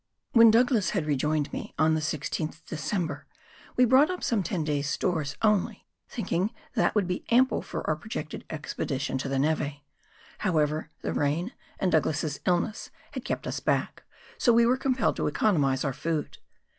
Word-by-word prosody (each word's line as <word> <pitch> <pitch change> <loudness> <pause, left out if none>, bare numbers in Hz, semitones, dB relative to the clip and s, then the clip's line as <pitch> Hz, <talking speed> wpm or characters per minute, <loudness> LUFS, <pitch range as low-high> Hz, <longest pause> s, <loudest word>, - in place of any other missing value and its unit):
When 230 -1 +8
Douglas 230 -2 +3
had 165 - 0
rejoined 150 +1 0
me - - -6
on 155 +1 +4
the 160 - +1
16th 155 +1 -3
December, 160 -1 -3 0.5
we 250 - +5
brought 260 +6 +5
up 365 -1 -4
some 225 -4 +1
ten 175 -2 -2
days' 145 -1 -1
stores 155 -3 -1
only, 210 -3 +1 0.2
thinking 205 -5 -1 0.2
that 220 - +1
would 205 -3 +3
be 180 - -3
ample 255 +2 +4
for - - -6
our 155 - +2
projected 155 -2 -6
expedition 140 -3 -3
to 135 - -3
the 135 - 0
neve; 150 0 0 0.6
however, 155 -5 0
the - - -1
rain 160 - 0 0.2
and 185 - 0
Douglas's 155 -1 +1
illness 180 +4 0 0.2
had - - -6
kept - - -3
us - - -3
back, - - -1 0.4
so 245 - +4
we 235 0 +5
were 245 +2 +4
compelled 260 -3 0
to - - 0
economise 145 -5 +2
our 135 - 0
food. 155 +2 -3
160 Hz, 170 wpm, -27 LUFS, 150-220 Hz, 0.6 s, When